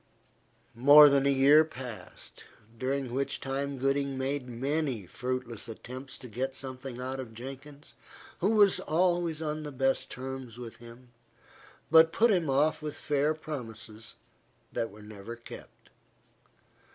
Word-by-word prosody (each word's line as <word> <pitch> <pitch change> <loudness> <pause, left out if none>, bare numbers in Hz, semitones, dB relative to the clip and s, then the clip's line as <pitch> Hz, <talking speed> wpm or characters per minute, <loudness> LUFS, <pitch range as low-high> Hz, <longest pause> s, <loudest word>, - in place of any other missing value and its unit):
More 145 +5 +9
than 140 0 +3
a - - +4
year 140 +3 +6
passed, 125 -10 -9 0.3
during 130 +1 -2
which 135 +2 -2
time 140 +1 -3
Gooding 135 +1 0
made 130 -1 -2
many 135 - -2
fruitless 125 +2 -4
attempts 130 +4 -7
to 130 - -10
get 130 +4 -3
something 130 -1 -6
out 130 +1 -4
of 115 -4 -8
Jenkins, 135 +4 -10 0.5
who 190 - +2
was 205 -3 +5
always 170 -1 0
on 155 0 -3
the 150 -1 -6
best 135 0 0
terms 130 -2 -7
with 120 -2 -8
him, 120 +1 -14 0.8
but 160 0 +7
put 230 +5 +4
him 175 -7 +1
off 145 +4 +2
with 150 -1 -5
fair 150 +1 0
promises, 115 -8 -7 0.6
that 115 - -1
were 105 +1 -14
never 105 +2 -9
kept. 120 - -13
135 Hz, 140 wpm, -29 LUFS, 125-150 Hz, 0.8 s, More